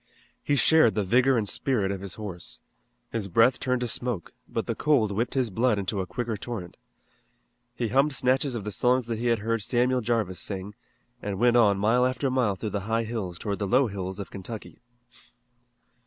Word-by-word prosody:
He 145 - +1
shared 140 -7 +5
the 105 - +1
vigor 125 +6 +3
and 105 -3 0
spirit 105 -4 0
of 95 -1 -4
his 100 -2 -6
horse. 95 -6 -7 0.5
His 110 -4 -3
breath 115 +7 +4
turned 125 -1 0
to 125 - -1
smoke, 120 -6 -2 0.2
but - - -2
the - - -1
cold 135 -9 +2
whipped 115 +7 -2
his 125 -5 +1
blood 115 +2 +2
into 100 0 -2
a 90 - -5
quicker 120 -3 -3
torrent. 105 -5 -6 1.0
He 120 -2 -2
hummed 135 +6 +3
snatches 130 0 +1
of 110 - -4
the 105 - -4
songs 125 +5 +2
that 115 -2 -3
he 120 - -1
had 115 -1 +3
heard 115 -1 0
Samuel 125 +4 +2
Jarvis 110 -5 -1
sing, 100 0 -4 0.5
and 100 -2 -3
went 120 +3 +3
on 105 -5 +5
mile 115 +5 +3
after 130 +1 0
mile 125 -6 +1
through 105 +2 -5
the 100 - -1
high 115 +1 +1
hills 110 -6 -4
toward 100 0 -3
the 100 - -1
low 130 +7 +4
hills 95 -3 -4
of 100 - -7
Kentucky. 105 +3 -8
115 Hz, 200 wpm, -26 LUFS, 100-125 Hz, 1.0 s, shared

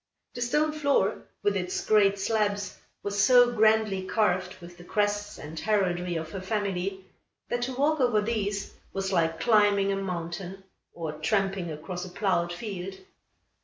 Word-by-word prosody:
The 245 - -6
stone 300 +6 +2
floor, 285 -9 +1 0.2
with 205 0 +2
its 180 -1 -2
great 200 -2 +4
slabs, 205 -1 -1 0.2
was 200 0 0
so 245 +1 +6
grandly 215 -3 +3
carved 185 -2 0
with 175 0 -12
the - - -10
crests 205 +2 -1
and 160 +2 -7
heraldry 180 -4 0
of 160 -1 -4
her 190 - -5
family, 190 -1 -2 0.4
that 240 - -1
to 255 +1 -2
walk 295 +4 +2
over 245 -4 +3
these 205 -2 -2 0.2
was 195 0 -2
like 165 -2 +1
climbing 205 -3 +4
a - - +1
mountain, 180 0 -5 0.3
or 165 -2 -4
tramping 190 +3 0
across 165 +4 -6
a 185 - -7
ploughed 180 -2 0
field. 190 0 -5
195 Hz, 155 wpm, -27 LUFS, 180-215 Hz, 0.4 s, so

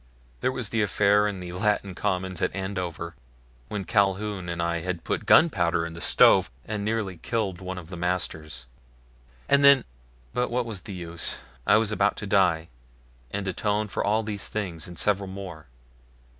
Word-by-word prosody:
There 130 - +1
was 125 -5 -3
the 115 - 0
affair 105 +1 +3
in 100 -3 -4
the 90 -1 -6
Latin 100 +1 0
Commons 95 -1 -2
at - - 0
Andover 90 -3 -4 0.5
when 100 +4 -4
Calhoun 100 -2 0
and 85 0 -4
I 85 0 0
had 90 -1 -4
put - - -2
gunpowder 85 - +4
in 85 - -6
the 85 - -9
stove - - +5 0.2
and 105 -1 -3
nearly 105 -4 -2
killed 100 -2 -2
one 95 0 -5
of 85 -2 -9
the - - -5
masters. 80 -6 -3 0.8
And 140 0 +4
then 140 -2 +8 0.5
but 125 0 0
what 120 0 0
was 110 -5 -5
the 100 - -8
use, 85 -2 -5 0.3
I - - +7
was 110 -1 +2
about 105 -1 +1
to - - -4
die 90 -5 +2 0.6
and 100 -1 -4
atone 105 +3 0
for - - -2
all 110 +2 +2
these 105 -2 -4
things 90 -7 -4
and 90 -1 -10
several 100 -1 +1
more. 95 -5 -8
95 Hz, 175 wpm, -26 LUFS, 85-105 Hz, 0.8 s, then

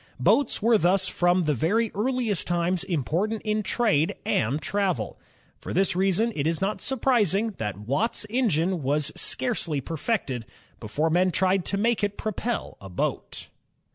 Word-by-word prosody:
Boats 280 -7 +2
were 230 -1 +5
thus 190 +2 +3
from 175 +1 +2
the 150 -2 +1
very 205 - +1
earliest 225 -2 -1
times 175 +1 0
important 180 - -1
in 215 0 0
trade 200 -5 +1
and. 125 +8 +1
travel. 185 - -2 0.4
For - - -6
this 190 0 +3
reason 195 +5 +2
it 145 0 0
is 165 -1 0
not 195 +2 -1
surprising 225 - +1
that 105 -3 -3
Watt's 140 - -1
er^ne 190 - +1
was 145 +1 +1
scarcely 180 - 0
perfected, 140 - -3 0.3
before 150 +9 -1
men 180 +3 +3
tried 185 +1 +1
to 200 - -1
make 225 +1 +1
it 205 0 -1
propel 220 +2 -3
a 95 - -9
boat. 90 - -3
185 Hz, 150 wpm, -26 LUFS, 155-215 Hz, 0.4 s, were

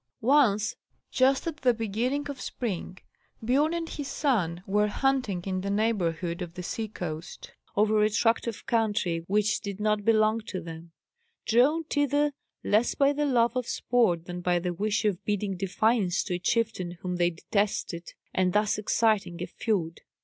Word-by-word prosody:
Once, 230 -6 +3 0.4
just 265 +1 +3
at 325 -2 -3
the 255 -5 +2
beginning 235 +7 -1
of 280 -3 -6
spring, 190 -6 -4 0.5
Biorn 275 +7 +2
and 335 -1 -3
his 290 -3 -5
son 205 - 0
were 210 +2 +2
hunting 250 -6 0
in 185 -1 -2
the 200 - -3
neighbourhood 185 -5 0
of 175 -1 -6
the 180 - -6
sea 220 +5 -3
coast, 170 -5 -7 0.2
over 215 +1 +3
a 210 - +4
tract 225 +2 +1
of 230 -2 -5
country 210 -9 0
which 210 +2 +2
did 200 -1 -6
not 210 0 +1
belong 215 0 +3
to 185 - -4
them; 165 0 -9 0.5
drawn 275 +8 +3
thither 290 -1 +1 0.3
less 215 +4 +2
by 280 0 +3
the 295 0 0
love 240 -2 +2
of 250 -2 -1
sport 185 -9 +1
than 180 0 -6
by 175 0 +2
the 175 0 -2
wish 210 +4 -1
of 200 -4 0
bidding 205 -1 -1
defiance 195 +1 +1
to - - -4
a 175 - -1
chieftain 185 -4 -1
whom 180 -1 -2
they 175 0 +3
detested, 175 -1 -2 0.2
and 185 -1 +1
thus 210 0 +2
exciting 210 -4 +1
a - - -2
feud. 175 -8 -2
210 Hz, 170 wpm, -27 LUFS, 180-240 Hz, 0.5 s, a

